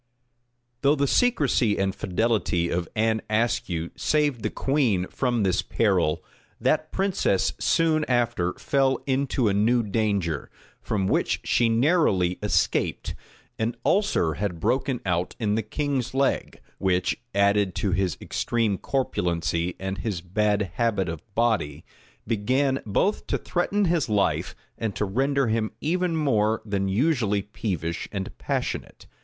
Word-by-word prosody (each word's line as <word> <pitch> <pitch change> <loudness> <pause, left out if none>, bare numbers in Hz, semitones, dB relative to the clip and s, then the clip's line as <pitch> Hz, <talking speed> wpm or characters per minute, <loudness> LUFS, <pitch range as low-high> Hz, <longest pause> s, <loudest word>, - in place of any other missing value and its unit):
Though 140 +1 +4
the 140 -1 +1
secrecy 140 - +2
and 95 0 0
fidelity 100 -4 0
of 85 -1 -2
Anne 110 0 +1
Ascue 105 -7 0
saved 150 -6 +1
the - - -1
queen 125 -10 +1
from 120 -4 0
this 95 -2 +2
peril, 95 -8 +1 0.4
that - - +1
princess 190 - +1
soon 160 -2 +2
after 120 -8 +1
fell 135 -2 +1
into 135 -3 +1
a 100 - +2
new 115 +4 +3
danger, 100 - -1 0.3
from 100 -3 -1
which - - +1
she 120 -1 +2
narrowly 115 - +2
escaped. - - 0 0.5
An 115 +2 -1
ulcer 190 - +2
had 95 -4 -2
broken 130 +6 0
out 90 -1 -1
in 105 -3 0
the 110 - +1
king's 130 +3 -2
leg, 135 0 0 0.2
which, 90 +1 0
added 100 -1 +3
to 100 - 0
his 90 -1 0
extreme 115 -5 -1
corpulency 85 -9 -1
and 95 0 -4
his 100 -6 -3
bad 105 +1 0
habit 105 -6 +1
of 80 -2 -5
body, 110 -12 0 0.4
began 130 +5 +1
both 195 - 0
to - - 0
threaten 200 +3 0
his 170 -7 +1
life 105 -2 0 0.2
and 110 -3 -2
to 105 - 0
render 135 +7 +1
him 110 -1 0
even 175 +2 0
more 110 -7 +2
than 100 -2 -1
usually 110 -2 +1
peevish 90 -6 -4
and 95 -2 -5
passionate. - - -3
110 Hz, 135 wpm, -25 LUFS, 95-135 Hz, 0.5 s, Though